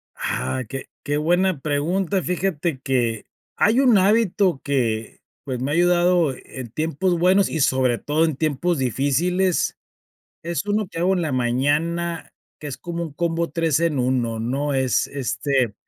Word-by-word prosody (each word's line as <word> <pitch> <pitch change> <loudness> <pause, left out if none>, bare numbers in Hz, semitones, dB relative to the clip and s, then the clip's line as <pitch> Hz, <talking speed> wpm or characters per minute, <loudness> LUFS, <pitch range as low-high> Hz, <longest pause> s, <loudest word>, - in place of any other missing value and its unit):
Ah, 130 -1 -2
qué 135 0 -5 0.2
qué 145 0 -1
buena 175 +2 +1
pregunta, 170 +7 0
fíjate, 170 -5 -1
que 120 -5 -1 0.3
hay 225 +5 +3
un 250 -6 +5
hábito 195 -5 +2
que, 115 -6 -1 0.2
pues, 130 -3 -4
me 140 +3 -1
ha - - 0
ayudado, 175 -1 +3
eh, - - -13
en 130 -3 -8
tiempos 165 - -1
buenos 185 +2 +4
y, 160 - -3
sobre 130 -3 +2
todo, 150 +5 0
en 160 -4 -1
tiempos 155 +3 0
difíciles. 150 - +1 0.7
Es 170 +4 -3
uno 205 -1 0
que - - -7
hago 180 +3 +2
en 180 - -1
la 155 - -1
mañana, 150 +7 0 0.3
que 150 - -8
es 140 - -5
como 170 0 -5
un 160 - -8
combo 170 +2 -1
3 165 -4 +1
en 165 -4 +1
1, 120 -3 0
¿no? 135 +5 -1
Es 130 -1 +1
este, 135 -4 -1
155 Hz, 160 wpm, -22 LUFS, 130-175 Hz, 0.7 s, un